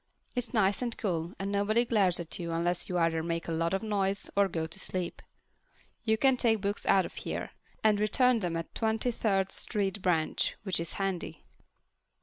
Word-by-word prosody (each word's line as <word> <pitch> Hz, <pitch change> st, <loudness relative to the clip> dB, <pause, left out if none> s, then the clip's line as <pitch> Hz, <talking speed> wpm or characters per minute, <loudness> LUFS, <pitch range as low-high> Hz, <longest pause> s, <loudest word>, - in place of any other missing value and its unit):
It's 245 Hz, -2 st, -2 dB
nice 205 Hz, -3 st, +2 dB
and 240 Hz, -2 st, -2 dB
cool, 170 Hz, -4 st, -2 dB
and 195 Hz, +1 st, -3 dB
nobody 210 Hz, +4 st, +2 dB
glares 195 Hz, -7 st, +3 dB
at 165 Hz, -2 st, -4 dB
you 170 Hz, -1 st, -3 dB
unless 170 Hz, +1 st, -1 dB
you 180 Hz, -, 0 dB
either 165 Hz, -1 st, +2 dB
make 165 Hz, 0 st, -3 dB
a -, -, -2 dB
lot 165 Hz, +1 st, 0 dB
of 195 Hz, +3 st, -1 dB
noise 200 Hz, -2 st, -1 dB
or 200 Hz, 0 st, +4 dB
go 165 Hz, -3 st, -2 dB
to 160 Hz, +4 st, -8 dB
sleep. 185 Hz, -2 st, -3 dB, 0.9 s
I 220 Hz, -, +5 dB
can 265 Hz, +3 st, +3 dB
take 225 Hz, -3 st, +3 dB
books 200 Hz, +1 st, -2 dB
out 190 Hz, -1 st, +5 dB
of -, -, -8 dB
here -, -, -4 dB, 0.3 s
and 215 Hz, -2 st, +4 dB
return 240 Hz, +4 st, +3 dB
them 175 Hz, -4 st, -1 dB
at 165 Hz, -, -6 dB
the -, -, -5 dB
Twenty 225 Hz, +2 st, +1 dB
third 195 Hz, -4 st, 0 dB
Street 200 Hz, -2 st, -2 dB
branch, 165 Hz, -4 st, +1 dB
which 190 Hz, -4 st, 0 dB
is 170 Hz, -1 st, -2 dB
handy. 185 Hz, -5 st, -3 dB
195 Hz, 195 wpm, -30 LUFS, 170-215 Hz, 0.9 s, I